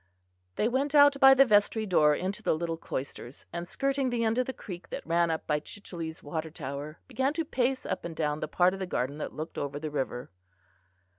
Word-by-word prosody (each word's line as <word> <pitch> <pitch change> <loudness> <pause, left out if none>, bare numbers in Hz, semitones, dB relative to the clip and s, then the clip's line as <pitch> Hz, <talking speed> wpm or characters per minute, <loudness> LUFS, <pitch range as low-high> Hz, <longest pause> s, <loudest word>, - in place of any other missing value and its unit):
They 215 - +1
went 275 +4 0
out 285 -1 +7
by 270 -1 +9
the 275 +1 +7
vestry 215 0 +3
door 150 -6 +4
into 190 +5 -3
the - - +1
little 165 +1 -2
cloisters, 135 -4 -6
and 170 0 -4
skirting 275 +3 0
the 240 -1 0
end 225 +2 +1
of 255 - +1
the - - -1
creek 185 -8 -9
that - - -6
ran 170 +1 +2
up 160 -1 -2
by 150 -1 +1
Chichele's 165 -1 -8
water 160 +2 -4
tower 145 +1 -6
began 265 +2 0
to 330 -1 -1
pace 260 -2 0
up - - -3
and 170 -1 -6
down 150 -1 -1
the 155 - -3
part 180 +4 +3
of 195 - -6
the 190 - -3
garden 140 -2 -2
that - - -5
looked 155 +2 -5
over 145 0 -3
the 155 0 -5
river. 130 -4 -3
175 Hz, 220 wpm, -29 LUFS, 155-250 Hz, -, by